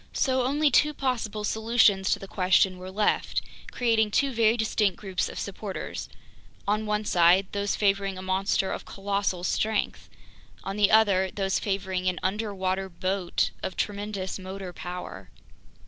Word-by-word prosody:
So 260 -1 +1
only 290 +2 +2
two 300 +4 +3
possible 225 -6 -2
solutions 220 -3 +3
to - - +2
the 195 - -9
question 185 0 +2
were 185 +1 -7
left, 205 +2 +1 0.3
creating 225 -3 +2
two 275 +5 +1
very 225 0 +3
distinct 215 -4 +1
groups 190 -3 -2
of - - -9
supporters: 200 0 -5 0.6
on 215 +1 0
one 210 0 0
side, 175 +1 +5
those 200 0 -1
favoring 195 -2 +1
a 185 - -7
monster 190 0 0
of - - -4
colossal 200 -2 -2
strength; 215 +3 -1 0.5
on 195 - -4
the 205 -1 +4
other, 200 -4 +4
those 195 0 -1
favoring 190 -2 -1
an 180 - -3
"underwater 190 -1 -1
boat" 185 0 -1
of 190 - -4
tremendous 200 -2 -3
motor 190 -1 -7
power. 165 - -7
195 Hz, 145 wpm, -27 LUFS, 185-215 Hz, 0.6 s, side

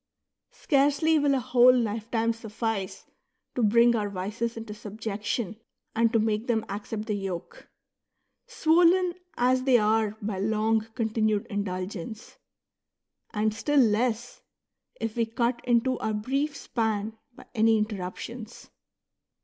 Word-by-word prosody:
Scarcely 290 +3 +2
will 285 -1 +3
a - - +1
whole 245 +1 +6
life 225 -1 -2
time 230 0 +1
suffice 225 -3 -4 0.5
to 250 - -1
bring 235 +2 +5
our 210 -2 -1
vices 210 +5 -3
into 225 -2 -6
subjec 215 -1 -6
tion 215 -1 -2 0.4
and 230 0 +3
to 230 - +3
make 220 +1 0
them 225 -3 +1
accept 210 +2 -5
the 215 - -2
yoke, 195 -4 -6 0.8
swollen 355 -4 +3 0.2
as 255 +1 +3
they 255 -1 +4
are 215 -1 +1
by 205 -2 -3
long 220 +2 +1
continued 215 -3 0
indulgence; 200 +2 -5 0.9
and 215 -1 0
still 275 +7 +1
less, 235 +1 +1 0.6
if 225 -1 -3
we 230 -1 +1
cut 235 +2 -1
into 245 +1 +2
our 215 -1 -1
brief 275 +7 -1
span 220 -3 -2 0.2
by - - -14
any 225 -1 +4
interrup 205 -4 -3
tions. 235 -1 -9
225 Hz, 135 wpm, -27 LUFS, 210-245 Hz, 0.9 s, whole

